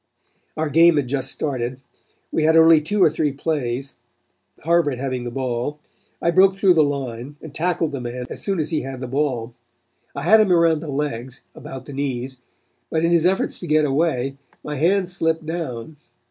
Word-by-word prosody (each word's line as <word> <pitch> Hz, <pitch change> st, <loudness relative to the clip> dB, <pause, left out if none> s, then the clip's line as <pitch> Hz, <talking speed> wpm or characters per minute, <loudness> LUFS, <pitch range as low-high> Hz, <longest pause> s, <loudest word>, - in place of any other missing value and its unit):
Our 155 Hz, -1 st, -1 dB
game 165 Hz, +2 st, +6 dB
had 140 Hz, -3 st, 0 dB
just 135 Hz, +1 st, -2 dB
started. 130 Hz, -3 st, -3 dB, 0.5 s
We -, -, 0 dB
had 160 Hz, +1 st, +4 dB
only 160 Hz, -1 st, +7 dB
two 195 Hz, +6 st, +1 dB
or -, -, +6 dB
three 155 Hz, -2 st, 0 dB
plays, 135 Hz, -3 st, -3 dB, 0.7 s
Harvard 165 Hz, -4 st, +2 dB
having 130 Hz, -1 st, -3 dB
the -, -, -3 dB
ball. 130 Hz, +3 st, -3 dB, 0.4 s
I 170 Hz, -, +1 dB
broke 190 Hz, +2 st, +5 dB
through 195 Hz, -2 st, +4 dB
the 160 Hz, -2 st, +4 dB
line 135 Hz, -2 st, -4 dB
and 155 Hz, -3 st, -11 dB
tackled 165 Hz, -1 st, 0 dB
the 140 Hz, -3 st, -5 dB
man 125 Hz, +1 st, -5 dB
as -, -, -7 dB
soon 195 Hz, -2 st, -1 dB
as 155 Hz, +2 st, -2 dB
he 155 Hz, -, 0 dB
had 135 Hz, 0 st, -6 dB
the 130 Hz, -, -5 dB
ball. 130 Hz, -3 st, -2 dB, 0.6 s
I 140 Hz, -, -4 dB
had 215 Hz, +7 st, +6 dB
him 205 Hz, -3 st, +2 dB
around 165 Hz, -2 st, +4 dB
the 160 Hz, -, -8 dB
legs 135 Hz, -3 st, -4 dB
about 130 Hz, -1 st, -9 dB
the 145 Hz, -, -9 dB
knees, 130 Hz, -2 st, -3 dB, 0.5 s
but 160 Hz, +1 st, 0 dB
in 170 Hz, -, +2 dB
his 170 Hz, 0 st, +4 dB
efforts 190 Hz, +1 st, -1 dB
to 175 Hz, -, -7 dB
get 155 Hz, 0 st, +3 dB
away, 135 Hz, -2 st, 0 dB, 0.3 s
my 150 Hz, -, -4 dB
hands 180 Hz, +4 st, +1 dB
slipped 160 Hz, -2 st, 0 dB
down. 155 Hz, -4 st, -5 dB
150 Hz, 190 wpm, -22 LUFS, 130-165 Hz, 0.7 s, only